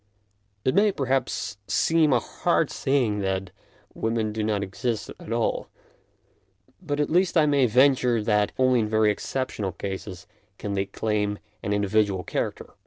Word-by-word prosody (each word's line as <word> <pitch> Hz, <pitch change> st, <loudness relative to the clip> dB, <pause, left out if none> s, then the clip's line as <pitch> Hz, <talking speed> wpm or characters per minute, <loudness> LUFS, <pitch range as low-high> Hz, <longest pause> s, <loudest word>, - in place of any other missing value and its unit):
It 130 Hz, -, +3 dB
may, 205 Hz, +2 st, +4 dB
perhaps, 130 Hz, -, -2 dB
seem 160 Hz, -2 st, +3 dB
a 125 Hz, -, +4 dB
hard -, -, 0 dB
saying 125 Hz, -7 st, +1 dB
that 95 Hz, -1 st, -2 dB, 0.4 s
women 110 Hz, -1 st, -1 dB
do 110 Hz, -, -2 dB
not 105 Hz, -2 st, 0 dB
exist 110 Hz, +4 st, -3 dB
at -, -, -9 dB
all, 115 Hz, 0 st, 0 dB, 1.1 s
but 145 Hz, -5 st, -3 dB
at 150 Hz, -, 0 dB
least 180 Hz, +1 st, +3 dB
I 155 Hz, -, +5 dB
may 140 Hz, -3 st, +3 dB
venture 125 Hz, 0 st, +4 dB
that 105 Hz, -1 st, +2 dB
only 130 Hz, -1 st, +4 dB
in 110 Hz, -2 st, 0 dB
very 110 Hz, -1 st, +3 dB
exceptional 105 Hz, -4 st, -3 dB
cases 95 Hz, -1 st, -6 dB, 0.3 s
can 105 Hz, -, -4 dB
they 100 Hz, 0 st, 0 dB
claim 105 Hz, 0 st, -1 dB, 0.2 s
an 105 Hz, -, -3 dB
individual 100 Hz, -2 st, +1 dB
character. -, -, -4 dB
110 Hz, 150 wpm, -25 LUFS, 105-130 Hz, 1.1 s, I